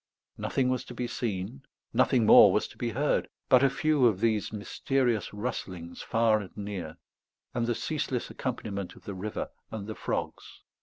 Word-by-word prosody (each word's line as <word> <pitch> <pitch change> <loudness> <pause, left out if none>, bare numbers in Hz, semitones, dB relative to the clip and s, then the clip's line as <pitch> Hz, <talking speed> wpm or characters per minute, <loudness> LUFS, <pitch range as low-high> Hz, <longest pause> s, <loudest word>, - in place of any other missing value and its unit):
Nothing 130 -2 0
was 130 -1 0
to - - -9
be 125 - -2
seen, 115 +1 -3 0.3
nothing 125 -5 +4
more 105 -2 +9
was 105 - +1
to - - -14
be 120 - -2
heard, 140 +6 0 0.2
but 130 - +7
a 140 - +5
few 140 -1 +3
of 105 -5 +1
these 110 -2 +1
mysterious 120 +2 0
rustlings 95 -6 -5
far 115 -1 +3
and 95 -4 -9
near, 100 -6 -5 0.6
and 115 -1 0
the 120 - +1
ceaseless 140 -5 -2
accompaniment 100 -7 -4
of - - -16
the 100 - -5
river 100 +3 -4 0.2
and 105 -3 -5
the 110 - -5
frogs. - - -4
110 Hz, 170 wpm, -29 LUFS, 100-125 Hz, 0.6 s, more